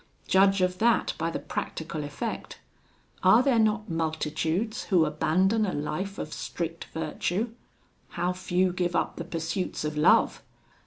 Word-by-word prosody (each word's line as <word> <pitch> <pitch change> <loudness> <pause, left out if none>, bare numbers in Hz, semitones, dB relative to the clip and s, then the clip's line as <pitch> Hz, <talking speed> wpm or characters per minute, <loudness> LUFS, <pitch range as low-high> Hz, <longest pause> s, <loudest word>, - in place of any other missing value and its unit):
Judge 195 0 +4
of 180 0 +1
that 235 +1 +3
by 165 +1 0
the - - -3
practical 155 -1 -4
effect: 145 0 -5 0.6
are 205 +7 +6
there 260 -4 +3
not 215 0 +2
multitudes 160 +5 -1
who 175 -5 +4
abandon 185 +8 +2
a 195 - -1
life 165 +7 -3
of 150 - -5
strict 165 -1 -4
virtue? 175 +7 -2 0.7
how 180 +1 +1
few 180 0 0
give 175 -1 -1
up - - 0
the 170 - -3
pursuits 165 +1 -3
of 150 0 -2
love! 150 - +4
180 Hz, 145 wpm, -27 LUFS, 160-195 Hz, 0.7 s, are